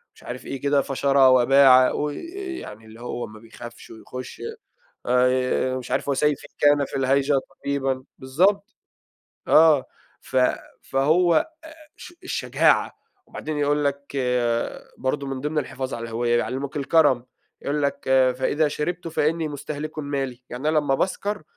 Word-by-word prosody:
مش - - -19
عارف 125 +1 -7
إيه 135 - -6
كده 140 0 +2
"فشرى 135 0 +3
وباعا"، 130 0 +6
وي 150 -1 -3 0.4
يعني 110 +2 -10
اللي 110 +1 -14
هو 120 0 -4
ما 110 0 -13
بيخافش 120 +1 -12
ويخش 125 +3 -9 0.7
آآ، 125 +1 +2
مش 125 - -9
عارف - - -1
"وسيفي 145 +1 0
كان 145 -1 +4
في - - -6
الهيجا 135 +2 +2
طبيبًا" 135 -1 -3
بالضبط 195 - +1 0.7
آه. 155 -4 +6 0.4
ف 130 - -4 0.4
فهو 160 +6 +2
آآ، 320 - +1 0.5
الش 350 - -11
الشجاعة 360 - +1 0.3
وبعدين 155 -1 -5
يقول 145 0 +1
لك 140 0 -3 0.8
برضو 135 +2 -2
من 135 -1 -4
ضمن 150 +2 -3
الحفاظ 130 -2 -3
على 115 - -5
الهويّة 120 +1 0
يعلّموك 135 +4 -3
الكرم، 140 -4 +3 0.4
يقول 145 +1 -1
لك: 140 0 0 0.4
"فإذا 145 +4 +1
شربتُ 165 +4 -3
فإنني 160 0 0
مستهلكٌ 150 +1 -6
مالي"، 135 -4 -4
يعني 130 +5 -2
أنا 155 - +2
لمّا 145 -2 +1
باسكر 200 +4 -2
140 Hz, 140 wpm, -23 LUFS, 130-150 Hz, 0.8 s, وباعا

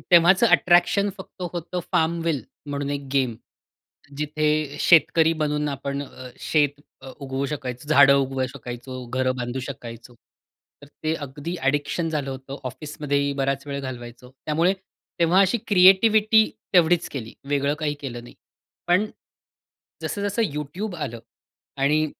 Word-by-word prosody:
तेव्हाचं 180 +6 +6
अट्रॅक्शन 185 +2 +4
फक्त 190 -1 -11
होतं 175 +1 -4
FARM 165 +1 +2
WILL 155 -5 +1 0.3
म्हणून 140 0 -3
एक 140 -1 -4
गेम 130 -4 +1 0.8
जिथे 150 -1 0
शेतकरी 160 -1 +5
बनून 150 0 0
आपण 140 0 -3
अ, 130 -2 -10
शेत 145 -2 +1 0.2
अ, 135 - -9
उगवू 135 0 -3
शकायचो, 130 -1 -5
झाडं 140 -2 +7
उगवू 135 -1 0
शकायचो, 125 0 -7
घरं 130 +1 0
बांधू 125 +1 -3
शकायचो. 120 -3 -8 0.7
तर - - -11 0.2
ते 155 +1 +1
अगदी 145 +3 -6
ॲडिक्शन 145 +4 0
झालं 145 -4 -2
होतं, 135 +1 -7
ऑफिसमध्येही 140 +1 -2
बराच 135 +1 -1
वेळ 140 0 -4
घालवायचो. 125 -1 -8 0.2
त्यामुळे 165 +4 +2 0.5
तेव्हा 170 +2 +4
अशी 195 +4 +3
क्रिएटिविटी 215 +3 +5 0.2
तेवढीच 175 0 +4
केली. 120 -7 -6 0.2
वेगळं 140 0 +1
काही 150 -2 -1
केलं 120 -4 -6
नाही. - - -14 0.5
पण 185 +5 +3 1.0
जसं-जसं 205 +2 -1
YouTube 175 +7 -5
आलं 130 -7 -5 0.6
आणि 150 +3 +3
145 Hz, 130 wpm, -24 LUFS, 135-170 Hz, 1.0 s, झाडं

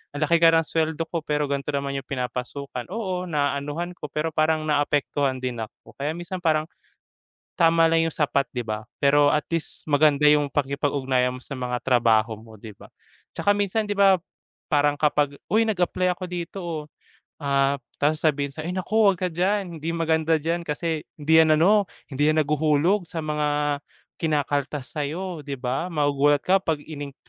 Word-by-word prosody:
Ang 145 - -4
laki 170 +3 +3
kara 165 -1 +6
ng - - -13
suweldo 160 0 0
ko 170 - -1
pero 150 0 0
gan'to 140 +1 -2
naman 140 0 -2
yung 130 - -12
pinapasukan. 125 0 -4
Oo, 185 -5 -3
naaanuhan 145 +2 -2
ko, 150 - -6
pero 150 +3 -2
parang 155 0 +1
naaapektuhan 145 -3 0
din 125 -2 -3
ako. 110 +1 -9
Kaya 150 +3 -1
minsan 175 +2 -5
parang, 155 -3 +2 0.9
tama 165 -1 +4
lang 165 0 +3
yung 160 - -6
sapat, 140 -3 +1
'di 120 - -1
ba? 110 0 -3 0.2
Pero 145 +1 +4
at 150 - +1
least 165 - -2
maganda 150 -1 +3
yung 150 -1 +4
pakikipag-ugnayan 135 -3 0
mo 125 - -11
sa - - -7
mga 125 -1 -3
trabaho 115 -3 +3
mo, 110 -1 -14
'di 110 +1 -10
ba? - - -15 0.5
Tsaka 205 - +3
minsan, 205 +2 0
'di 205 - -2
ba, 195 -1 +5 0.6
parang 145 0 +3
kapag, 145 -2 +1 0.2
"Uy, 220 +1 +5
nag-apply 185 -2 0
ako 185 - -6
dito, 180 +1 -6
oh." 160 -3 -4 0.6
Ah, 140 -1 +2 0.3
tapos 150 +2 +2
sabihin 145 -3 +2
sa'yo, 155 +3 -6
"Ay, 180 - -3
naku, 185 +4 -3
'wag 200 -3 +5
ka 185 - +1
diyan. 185 +1 -1
Hindi 160 +2 -4
maganda 160 -1 +2
diyan 170 +3 -2
kasi 155 +1 -2 0.2
hindi 155 +2 +3
'yan 155 -1 +5
ano, 205 +4 +5 0.3
hindi 145 +3 +1
'yan 155 0 +3
naghuhulog 155 +6 +2
sa 165 - -5
mga 150 -1 0 0.4
kinakaltas 145 -3 -1
sa'yo," 165 +4 -3
'di 140 - -3
ba? 130 +8 -2
Magugulat 145 -1 +2
ka 190 +1 +4
'pag 160 -4 0
in-inc 145 -3 -8
150 Hz, 180 wpm, -24 LUFS, 140-165 Hz, 0.9 s, kara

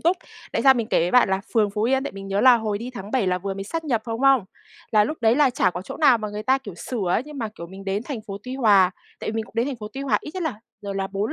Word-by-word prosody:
túc. 345 +3 +2 0.4
Tại - - 0
sao 270 -1 +7
mình 235 -3 -1
kể 215 - +2
với 175 - +1
bạn 250 -1 +5
là 190 0 +1
phường 210 -2 +3
Phú 210 +1 -2
Yên, 265 +4 +2
tại - - -4
mình 195 0 -8
nhớ 195 +1 0
là 255 0 +7
hồi 215 -3 -2
đi 240 +3 -6
tháng 205 -4 -8
7 245 -5 +1
là 180 0 +1
vừa 195 +1 -4
mới 195 - -5
sát 325 +9 -4
nhập 235 -7 0
thôi, 230 - -4
đúng 225 - -4
không? 270 -6 +5 0.5
Là 210 -1 +5
lúc 310 +8 -4
đấy 225 +1 +4
là 290 -3 +4
chả 210 -6 +2
có 180 0 -6
chỗ - - -8
nào 270 -7 +5
mà 215 -1 -4
người 210 +1 -5
ta, 260 +4 +3
kiểu, 210 -9 -9
sửa 200 +2 -4
ấy, 200 - +2
nhưng 300 -1 -9
mà, 225 -3 -2
kiểu, 190 -5 -10
mình 190 +3 -11
đến 200 +2 -1
thành 260 -5 -5
phố 195 -1 -6
Tuy 255 +2 -6
Hòa. 205 -8 +5 0.3
Tại - - -3
vì - - -6
mình 225 0 -1
cũng - - -20
đến 230 +2 +2
thành 280 -2 -3
phố 210 -2 -7
Tuy 270 - -6
Hòa 275 -1 +1
ít - - -8
nhất 370 - -3
là 310 -10 -3 0.2
rồi 200 -1 -5
là 195 0 -1
4 200 +6 -2
220 Hz, 345 wpm, -23 LUFS, 195-260 Hz, 0.5 s, sao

